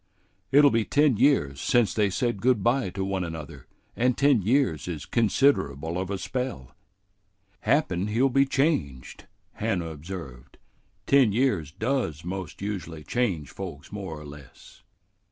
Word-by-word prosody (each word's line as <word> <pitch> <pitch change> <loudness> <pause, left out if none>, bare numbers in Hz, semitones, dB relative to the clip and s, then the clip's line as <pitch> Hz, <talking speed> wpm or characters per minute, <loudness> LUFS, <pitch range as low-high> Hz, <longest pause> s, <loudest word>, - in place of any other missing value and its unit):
It'll 145 0 +6
be 115 -1 +2
ten 145 -1 +2
years 70 - +2
since 120 -4 +2
they 105 -2 +2
said 120 +1 -1
good 125 -5 +2
by 120 -2 +2
to 95 +1 -4
one 95 -1 -2
another, 80 -4 -8 0.3
and 125 +1 +1
ten 140 -5 +4
years 105 - +1
is 80 -5 -5
considerable 90 - +1
of 95 0 -3
a 100 - -2
spell." 125 - -4 0.9
"Happen 100 - +1
he'll 115 +6 +2
be 135 +1 +3
changed," 135 - -1 0.3
Hannah 100 -7 -2
observed. 75 -5 -9 0.5
"Ten 135 -6 +4
years 105 - +1
does 105 - -2
most 95 0 -6
usually 85 -6 -5
change 85 - -1
folks 85 -7 -8
more 95 -7 -6
or 75 - -11
less." 70 -3 -14
100 Hz, 140 wpm, -26 LUFS, 80-125 Hz, 0.9 s, It'll